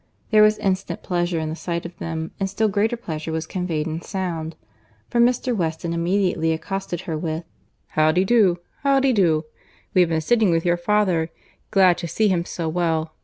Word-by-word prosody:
There 215 -1 +6
was 215 0 +5
instant 190 0 -2
pleasure 175 -1 -1
in 160 -1 -2
the 160 - -4
sight 170 0 -4
of 170 0 -8
them, 160 -1 -4
and 195 -1 -1
still 220 +3 +1
greater 215 +3 +1
pleasure 160 -7 -5
was 160 0 -2
conveyed 170 -4 -2
in 160 +1 -4
sound—for 175 +5 -6
Mr. 245 +1 +2
Weston 165 -2 -2
immediately 170 -1 +1
accosted 180 +1 -4
her 165 -4 -4
with, 160 +1 -3 0.5
"How 155 0 +3
d'ye 180 +3 +2
do?—how 220 +6 +2
d'ye 270 0 +3
do?—We 165 -2 0
have 175 - +3
been 160 -1 +1
sitting 215 +5 +2
with 165 0 +1
your 175 0 +3
father—glad 185 0 +1
to 170 - -4
see 210 +6 +1
him 175 -2 +1
so 170 -2 -4
well. 160 -1 -1
175 Hz, 175 wpm, -22 LUFS, 160-200 Hz, 0.5 s, There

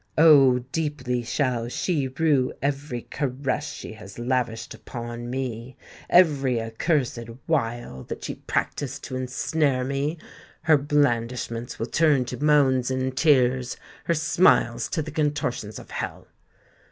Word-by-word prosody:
Oh! 135 -6 +7
deeply 145 -6 -1
shall 120 -1 -1
she 145 0 -1
rue 135 -1 +1
every 140 -3 -2
caress 140 +2 -2
she - - -8
has 105 -2 -12
lavished 120 -2 -1
upon 120 0 -7
me—every 130 +3 +1
accursed 120 +4 0 0.3
wile 120 - -1
that - - -7
she - - -3
practised 145 0 -3
to 130 - -5
ensnare 130 +1 0
me! 140 +5 -1 0.5
Her 155 -2 +5
blandishments 120 -4 0
will 115 - -2
turn 145 -2 +3
to 130 - -5
moans 135 -4 +4
and 130 0 -1
tears—her 130 +2 +1
smiles 155 -7 +3
to 160 - -1
the 155 - -7
contortions 145 -8 -1
of - - -11
hell. - - -5
130 Hz, 120 wpm, -25 LUFS, 120-150 Hz, 0.5 s, Oh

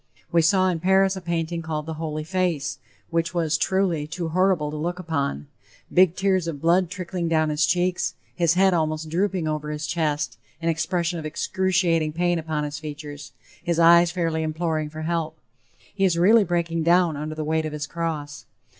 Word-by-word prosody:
We 170 - +4
saw, 185 +3 +3
in 175 -2 -1
Paris, 190 +2 +3
a 190 - -6
painting 170 -1 -2
called 155 -2 -4
"The 160 - -4
Holy 155 -1 -4
Face," 160 - -15
La 185 - +1
Sainte 180 -2 +2
Face, 140 +3 -9
which 165 +1 0
was, 160 -3 +1
truly, 170 -1 0
too 165 +1 -4
horrible 180 -3 +1
to - - -6
look 170 +4 -3
upon; 140 - -2 0.5
big 180 -1 +5
tears 190 -3 +1
of 155 -4 -4
blood 175 +3 +3
trickling 180 -1 -4
down 155 -1 +2
his 150 0 +2
cheeks, 180 0 0 0.2
his 170 -1 +2
head 190 0 +4
almost 155 -1 -1
drooping 185 0 0
over 150 -1 -3
his 150 0 -4
chest, 150 -3 -1 0.2
an 165 0 -1
expression 170 +1 -1
of 155 - -7
excruciating 170 -2 0
pain 175 +1 +1
upon 155 -2 -2
his 145 0 -4
features, 150 -1 -8 0.3
his 170 -1 0
eyes 170 +1 +6
fairly 165 -2 -1
imploring 155 -1 -2
for 155 +1 -7
help, 160 -1 -2 0.6
he 195 - -1
is 180 -3 +3
really 210 +6 +6
breaking 170 -2 -1
down 170 0 +3
under 155 +2 -5
the 155 - -3
weight 160 +1 0
of - - -6
his 150 0 -3
cross. 150 -3 -5
165 Hz, 195 wpm, -24 LUFS, 155-175 Hz, 0.6 s, eyes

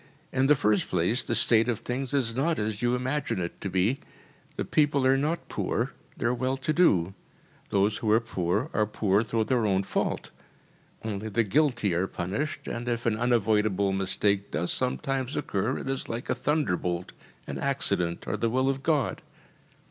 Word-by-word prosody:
In 130 +1 +2
the 150 - +6
first 105 -7 +2
place, 90 +8 +1
the - - -1
state 115 0 +4
of 120 -4 -1
things 125 +1 -3
is 125 -5 0
not 160 +5 +1
as 105 0 -2
you 120 0 +2
imagine 130 -2 -1
it 85 -1 -5
to 100 - -3
be. 95 +8 +1 0.6
The - - -2
people 145 -3 +2
are 130 +1 +5
not 150 +5 -1
poor. - - -1 0.3
They - - -3
are 120 - +3
well 130 +2 -1
to 135 +3 -1
do. 95 - +3 0.6
Those 100 +1 +2
who 110 - -2
are 110 - +6
poor 90 -6 -1
are 105 -1 +2
poor 105 -1 +2
through 110 0 0
their 120 -2 +1
own 95 -1 +2
fault. - - -2 0.7
Only 110 0 -3
the 115 +3 +2
guilty 120 - +2
are 90 +3 +1
punished, 105 - -3
and 120 +1 -3
if 120 0 -2
an 115 -2 +2
unavoidable 110 -4 +2
mistake 100 +1 +1
does 85 +2 -1
sometimes 130 +1 -1
occur, 100 -1 -1
it - - -6
is 135 -1 -3
like 115 +2 -3
a - - +4
thunderbolt 90 - -1 0.3
an - - -5
accident, 100 -11 0
or - - -1
the 115 - +1
will 130 +3 +2
of 135 0 -5
God. 150 -2 0
115 Hz, 185 wpm, -27 LUFS, 100-135 Hz, 0.7 s, the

